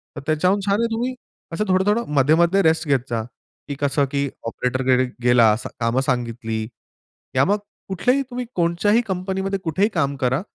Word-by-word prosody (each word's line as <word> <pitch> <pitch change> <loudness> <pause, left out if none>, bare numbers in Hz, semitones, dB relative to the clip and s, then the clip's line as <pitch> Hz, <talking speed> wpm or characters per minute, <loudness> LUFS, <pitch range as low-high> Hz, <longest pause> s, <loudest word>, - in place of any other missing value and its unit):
तर 145 - -6
त्याच्याहून 180 +7 +2
छान 200 +1 +1
आहे 230 - 0
तुम्ही 245 +3 -1 0.4
असं 190 - 0
थोडं-थोडं 205 +5 +2
मध्ये-मध्ये 170 +7 +4
रेस्ट 160 -1 +2
घेत 140 -2 +3
जा 115 -1 -1 0.5
की 145 - -4
कसं 140 0 +2
की 140 0 0 0.2
ऑपरेटरकडे 130 +1 +1 0.2
गेला, 120 -3 +5 0.2
कामं 115 +2 +1
सांगितली. 115 -4 -2 0.7
या 135 - +4
मग 205 +2 +2 0.3
कुठलेही 250 +9 +1
तुम्ही 250 0 -4
कोणच्याही 175 +6 +2
कंपनीमध्ये 190 +1 -2
कुठेही 185 +6 +1
काम 140 -1 0
करा. 130 +5 +1
160 Hz, 155 wpm, -22 LUFS, 130-195 Hz, 0.7 s, गेला